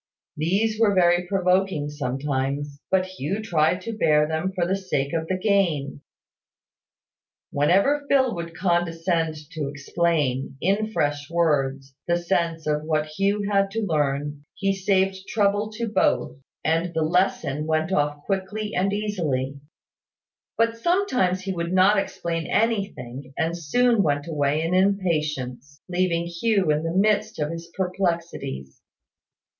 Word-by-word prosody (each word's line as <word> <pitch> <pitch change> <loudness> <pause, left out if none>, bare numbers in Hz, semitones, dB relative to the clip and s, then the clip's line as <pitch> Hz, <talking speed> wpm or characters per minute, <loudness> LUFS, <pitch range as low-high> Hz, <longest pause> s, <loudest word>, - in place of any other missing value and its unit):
These 200 +8 0
were 210 -3 +4
very 175 -1 +3
provoking 185 -4 +1
sometimes; 140 +1 -2
but 185 -1 +3
Hugh 185 +1 -4
tried 175 -3 +1
to 230 +3 -5
bear 150 -7 +3
them 160 +4 -1
for 180 -2 -1
the 185 +2 +1
sake 150 -7 -2
of 160 -1 -1
the 185 - 0
gain. 180 -9 +1 1.5
Whenever 200 - +2
Phil 260 -3 +3
would 170 -1 -6
condescend 165 -2 0 0.2
to 155 -6 -3
explain, 145 -2 -1
in 205 +4 0
fresh 145 -6 -1
words, 140 -5 0
the 175 0 +2
sense 170 -2 -1
of 150 0 0
what 155 -1 0
Hugh 200 +2 +1
had 195 -1 +2
to 225 +2 -2
learn, 145 -3 -1
he 195 -1 0
saved 190 0 0
trouble 210 -1 +1
to 230 +2 -3
both, 125 - +1 0.3
and 165 +2 0
the 160 - +2
lesson 155 -3 0
went 160 +2 0
off 145 -3 0
quickly 205 +2 -2
and 195 +2 +1
easily: 155 -11 -2 1.0
but 230 0 +1
sometimes 255 - +1
he 190 0 -3
would 170 -1 -3
not 195 +2 +5
explain 165 -4 -3
anything, 145 - -2
and 165 0 0
soon 230 +8 +2
went 145 -3 0
away 150 -1 0
in 165 +2 -1
impatience, 155 -8 0
leaving 175 -2 0
Hugh 185 0 +1
in 150 0 +1
the 165 0 -2
midst 215 +2 +2
of 150 0 -1
his 165 0 -7
perplexities. 170 - -3
170 Hz, 140 wpm, -24 LUFS, 150-195 Hz, 1.5 s, not